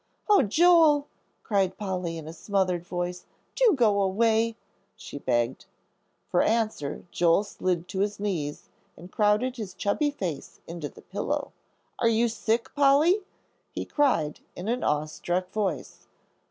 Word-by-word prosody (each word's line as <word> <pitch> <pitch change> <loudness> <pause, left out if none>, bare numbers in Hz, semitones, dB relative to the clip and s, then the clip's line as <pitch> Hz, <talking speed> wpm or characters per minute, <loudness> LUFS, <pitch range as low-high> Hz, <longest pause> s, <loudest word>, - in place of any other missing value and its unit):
"Oh, 415 -2 +6
Joel," 310 - +5 0.4
cried 195 -3 0
Polly, 180 -4 -3
in 160 -1 -8
a 160 - -7
smothered 185 -2 -1
voice; 180 0 -4 0.3
"do - - +4
go 215 -6 +3
away," 225 +3 +2 0.4
she 145 - -9
begged. 120 -1 -1 0.6
For 175 - +3
answer 215 -11 -1
Joel 170 +3 +3
slid 180 -4 -2
to 190 0 -4
his 205 0 -1
knees 170 -8 -3 0.3
and 175 +3 -12
crowded 215 +5 +1
his 205 -5 -6
chubby 290 +9 0
face 180 - -5
into 165 -3 -6
the - - -16
pillow. - - -3 0.5
"Are 230 - +3
you 230 +1 +2
sick, 230 +1 -1
Polly?" 290 +8 +4 0.5
he - - -5
cried, 210 - +1 0.2
in 180 - -6
an 245 +2 -1
awe 150 +1 +1
struck 175 +4 -3
voice. 190 -11 -3
200 Hz, 140 wpm, -27 LUFS, 175-230 Hz, 0.6 s, Oh